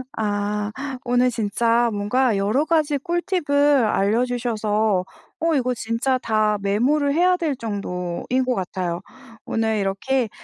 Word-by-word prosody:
아 205 0 -1 0.3
오늘 245 +1 +2
진짜 230 +1 +1
뭔가 210 +2 +1
여러 215 +10 +1
가지 310 -3 +1
꿀팁을 290 - +1
알려 215 +3 +2
주셔서 220 -5 0 0.4
어 330 0 +1
이거 255 -2 +1
진짜 230 +4 0
다 215 -3 +1
메모를 275 +9 +1
해야 360 +3 +3
될 310 -6 -1
정도인 200 +2 -3
것 250 -1 0
같아요. 180 -2 -3 0.4
오늘 220 -1 0
이렇게 215 +5 0
230 Hz, 245 characters per minute, -22 LUFS, 205-270 Hz, 0.4 s, 해야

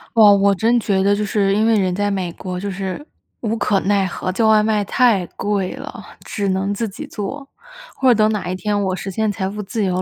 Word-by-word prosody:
哇， 220 -2 +8
我 200 0 +5
真 225 +5 +2
觉 200 -4 +1
得， 200 +1 +3
就 210 - -2
是 200 -1 +1
因 215 +1 +2
为 225 -2 +3
人 185 -2 0
在 205 0 0
美 180 -3 -3
国， 180 -1 -6
就 200 +1 -4
是 195 +8 -5 0.3
无 225 -1 -2
可 205 -3 +1
奈 200 0 +1
何， 185 0 -4
叫 220 +5 0
外 215 -1 +5
卖 210 -1 +1
太 220 -3 +2
贵 200 -2 -1
了， 275 +2 -9 0.2
只 200 -2 -2
能 190 +2 0
自 225 +2 -2
己 195 - -8
做。 270 +7 -6 0.5
或 260 -1 +2
者 240 - +6
等 215 0 +4
哪 185 -4 -3
一 185 - -2
天 205 +2 -1
我 190 - -1
实 195 +1 -5
现 215 +2 -1
财 190 -2 -3
富 210 +1 -6
自 205 +1 -2
由 185 0 0
205 Hz, 260 characters per minute, -19 LUFS, 190-215 Hz, 0.5 s, 哇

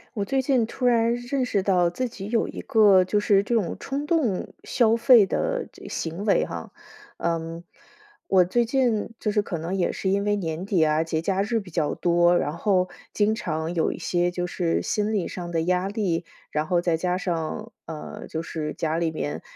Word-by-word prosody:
我 200 -1 -1
最 270 +4 +1
近 260 -3 +2
突 250 +3 -4
然 235 -1 +3
认 245 +2 -2
识 200 -6 0
到 180 -3 +3
自 250 +8 -3
己 195 -3 -8
有 230 0 +2
一 - - -7
个 200 -4 +5
就 205 +3 0
是 200 -1 +4
这 235 +4 -1
种 205 -7 0
冲 280 +2 -3
动 295 - 0
消 230 -2 +3
费 230 -2 +7
的 - - -1
这 - - -12
行 170 +5 -4
为 200 - +3
哈， - - -7 0.5
嗯， 165 0 -3 0.6
我 190 -2 +5
最 235 +7 +1
近 235 -3 +1
就 210 - 0
是 210 0 +2
可 185 -4 -4
能 165 +3 -4
也 190 -2 0
是 190 - -2
因 200 +1 +1
为 205 0 +2
年 170 -2 -3
底 190 -5 +2
啊， 155 0 +2
节 160 -1 -1
假 190 +3 0
日 225 +2 0
比 190 -3 -13
较 155 -2 0
多， 175 0 +3
然 150 0 -2
后 185 -1 +2 0.2
经 210 +1 +2
常 160 -5 -3
有 165 -2 +1
一 - - -8
些 175 0 0
就 175 0 -2
是 175 -2 0
心 210 +1 -1
理 195 -5 -1
上 175 -2 -6
的 165 -1 0
压 180 +2 +1
力。 190 -5 -1 0.3
然 155 +1 -1
后 175 0 +2
再 170 -2 +1
加 180 +2 0
上， 185 +5 -3
呃， 160 -2 -8
就 160 - -4
是 155 -2 -4
家 160 0 -1
里 170 -1 +1
面， 80 - -4
190 Hz, 225 characters per minute, -25 LUFS, 170-220 Hz, 0.6 s, 费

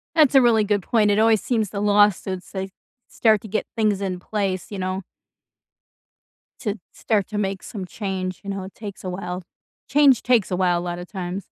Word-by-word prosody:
That's 300 -4 +5
a 270 - +9
really 230 -3 +4
good 205 -2 0
point, 215 -1 +2
it 205 - +2
always 220 -1 +4
seems 220 -5 0
the 200 - -4
lawsuits, 205 -3 +2
they 190 0 -4 0.4
start 215 -3 +3
to 220 - -9
get 215 +2 -1
things 210 -3 +1
in 185 -2 -2
place, 195 -1 -3
you 200 - -5
know 185 +1 -2 1.6
to 215 -4 -3
start 210 -4 0
to 210 - -4
make 195 -2 -2
some 195 -4 -6
change, 185 -2 -4
you 200 - -7
know, 195 -1 -3
it 190 - -10
takes 205 -3 -8
a 185 - -3
while, 180 0 -5 0.5
change 280 -3 +5
takes 240 -6 +2
a 180 - 0
while, 180 -1 +2
a - - -4
lot 175 0 -4
of 180 - -8
times. 185 -1 -5
200 Hz, 200 wpm, -23 LUFS, 185-215 Hz, 1.6 s, a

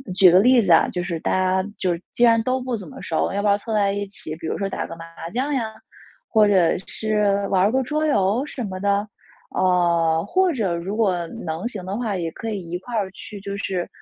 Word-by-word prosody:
举 185 -2 +7
个 180 - +7
例 245 +4 +5
子 190 -5 +1
啊， 165 - +6
就 180 - -3
是 170 -2 -3
大 - - -2
家 185 +1 +1
就 175 -2 0 0.2
既 240 - +1
然 230 -1 +6
都 255 +2 0
不 250 -2 -2
怎 195 -5 -9
么 - - -10
熟， 160 - 0
要 200 - 0
不 210 - 0
要 200 0 +4
凑 220 +2 -5
在 200 -2 +2
一 200 0 -3
起， 195 -5 -8
比 165 -1 -6
如 - - -2
说 195 -1 -2
打 - - -3
个 165 - -8
麻 165 0 -9
将 265 +6 -1
呀， 265 - +1 0.7
或 215 -2 +4
者 185 -5 +4
是 215 -1 -1 0.3
玩 190 -2 +3
儿 205 - +3
个 265 +2 +1
桌 305 +4 -1
游 210 -3 +2
什 255 - -5
么 190 -3 -5
的？ 200 +1 +1 0.4
啊， 170 -3 +2
或 370 - +2
者 200 - -1
如 180 +5 -4
果 185 -6 +1 0.2
能 165 +6 -3
行 205 -7 -7
的 190 +2 -3
话， 225 -4 -2
也 165 -2 -3
可 225 +7 -6
以 195 -5 -5
一 175 - -2
块 235 +6 -7
儿 200 -3 -1
去， 215 +1 -10
就 200 0 -5
是， 185 -3 -2
200 Hz, 260 characters per minute, -22 LUFS, 180-225 Hz, 0.7 s, 举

